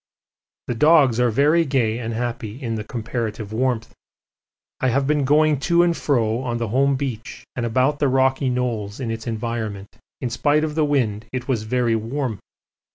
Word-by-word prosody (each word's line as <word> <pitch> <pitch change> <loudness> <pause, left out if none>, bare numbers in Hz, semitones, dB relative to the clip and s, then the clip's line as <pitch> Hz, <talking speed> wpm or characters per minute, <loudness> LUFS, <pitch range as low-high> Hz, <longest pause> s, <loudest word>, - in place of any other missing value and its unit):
The - - -2
dogs 140 -2 +4
are 125 0 +3
very 150 +8 +3
gay 125 -6 0
and 115 -1 -4
happy 115 -1 -4
in 120 -5 -3
the 110 -1 -3
comparative 110 -2 -4
warmth. 120 -1 -1 0.9
I 130 - +1
have 135 +3 +1
been 145 -1 +1
going 150 +1 +3
to 170 0 +5
and 170 -1 +2
fro 115 -7 +1
on 120 -2 -2
the 115 -2 -3
home 135 +4 +2
beach 130 -4 -5
and 120 -2 -1
about 130 +5 +1
the 145 - +2
rocky 135 +1 +2
knolls 120 -4 -2
in 120 -4 -3
its 115 +1 -5
environment 110 -3 -4 0.2
in 125 - -3
spite 145 +6 +2
of 155 -1 -2
the 155 0 +2
wind 115 -7 0
it 125 -1 -4
was 125 -5 0
very 120 -2 +2
warm. 115 0 -3
125 Hz, 180 wpm, -22 LUFS, 115-140 Hz, 0.9 s, to